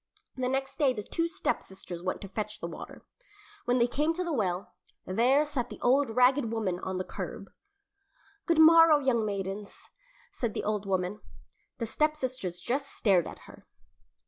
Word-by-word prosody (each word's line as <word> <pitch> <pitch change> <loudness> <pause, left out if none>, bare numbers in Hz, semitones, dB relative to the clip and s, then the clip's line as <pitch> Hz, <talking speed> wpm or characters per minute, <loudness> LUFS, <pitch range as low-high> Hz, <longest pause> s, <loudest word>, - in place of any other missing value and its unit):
The 255 -1 -1
next 270 +2 -2
day 275 -4 +4
the 210 -3 -5
two 330 +10 -1
stepsisters 190 - -4
went 185 +1 -3
to 195 - -6
fetch 210 +2 -4
the - - -5
water. 170 - -10 0.6
When 245 +1 +2
they 235 - +4
came 295 +6 0
to 365 - -1
the 340 -2 -2
well, 190 -7 -1 0.3
there 250 +10 +3
sat 265 -5 -3
the - - -9
old 270 +2 +3
ragged 250 +1 +3
woman 205 -6 -1
on 185 0 -4
the 185 - -1
curb. - - -7 1.0
"Good 335 - +3
morrow, 325 -1 +8
young 260 -5 +1
maidens," 200 0 -5 0.4
said 235 -4 -3
the - - -2
old 210 -1 -2
woman. 190 +2 -1 0.6
The 230 - -2
stepsisters 255 - -1
just 270 +9 -2
stared 190 -6 +2
at - - -10
her. - - -15
240 Hz, 170 wpm, -29 LUFS, 195-280 Hz, 1.0 s, morrow